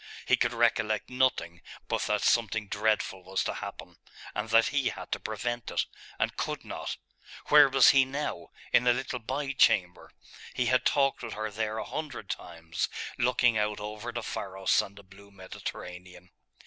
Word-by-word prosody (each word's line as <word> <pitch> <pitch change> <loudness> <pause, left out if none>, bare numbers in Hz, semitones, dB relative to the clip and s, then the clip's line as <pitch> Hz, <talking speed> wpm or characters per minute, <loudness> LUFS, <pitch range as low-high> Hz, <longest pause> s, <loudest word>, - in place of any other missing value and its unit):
He - - +5
could - - +1
recollect 110 +3 +1
nothing 125 -10 0 0.3
but - - -1
that - - 0
something 110 -2 +2
dreadful 105 -2 0
was 95 +1 -1
to - - -2
happen - - -8 0.4
and 105 +1 -3
that 115 +1 +5
he 145 -2 +1
had - - -8
to - - -1
prevent 120 +2 -3
it, - - 0 0.3
and - - 0
could - - -3
not.... - - -5 0.5
Where 145 -2 +8
was 135 0 +7
he 135 -1 +6
now? 135 - -4 0.3
In 125 - +5
a 120 - +7
little 125 0 -3
by 135 +4 -3
chamber.... 90 -9 +2 0.5
He 125 - +1
had 130 +2 +2
talked 135 -1 +2
with 115 -2 -5
her 110 0 -3
there 110 +1 -2
a 110 - -3
hundred 150 -10 -5
times, 85 0 -4 0.3
looking 120 -2 +3
out 105 0 -1
over 105 +3 -6
the 120 -1 -4
Pharos 95 -2 0
and 100 - -9
the 100 - -13
blue 100 +1 -16
Mediterranean.... 90 -2 -9
110 Hz, 175 wpm, -29 LUFS, 100-125 Hz, 0.5 s, Where